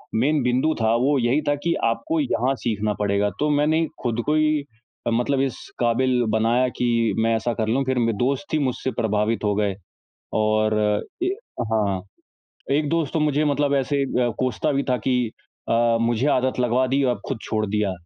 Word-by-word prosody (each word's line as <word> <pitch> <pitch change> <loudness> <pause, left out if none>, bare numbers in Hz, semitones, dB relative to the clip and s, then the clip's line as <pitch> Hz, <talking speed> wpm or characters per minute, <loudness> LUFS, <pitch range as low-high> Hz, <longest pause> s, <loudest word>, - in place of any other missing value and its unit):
Main 140 +5 +2
बिंदु 125 +6 +2
था 110 0 +3
वो 135 +4 +2
यही 125 +5 +2
था 145 - +3
कि 170 - +2
आपको 320 - 0
यहाँ 135 - +1
सीखना 110 -3 -1
पड़ेगा। 100 0 +1
तो 150 0 +1
मैंने 155 +3 +2 0.2
खुद 120 -1 0
को 150 +1 +1
ही 155 -2 +2 0.5
मतलब 130 +3 +1
इस 135 -2 -1 0.2
काबिल 125 +1 +2
बनाया 115 +4 +2
कि 115 -2 +1
मैं 115 0 +2
ऐसा 115 +1 -1
कर 110 - 0
लूँ 130 +5 +1
फ़िर 130 -1 0
म - - +2 0.2
दोस्त 135 +7 +1
ही 155 - +3
मुझसे 130 -1 -1
प्रभावित 110 +1 0
हो 105 -1 +2
गए। 100 -2 0 0.6
और 110 0 +2 0.5
ए - - +1 0.4
हाँ, 100 -4 +1 0.7
एक 150 +1 +1
दोस्त 165 -3 0
तो 160 - 0
मुझे 150 0 +2
मतलब 145 -1 +1
ऐसे 140 +1 0
अ, 125 -2 0
कोसता 130 +4 0
भी 140 0 +1
था 125 - +3
कि 130 - +3 0.5
अ, 115 0 +3
मुझे 120 +3 +1
आदत 130 -1 +1
लगवा 125 +1 +2
दी 135 +2 +1
अब 120 - -2
खुद 135 -5 -3
छोड़ 110 -1 -1
दिया। 105 -1 0
125 Hz, 185 wpm, -23 LUFS, 110-140 Hz, 0.7 s, था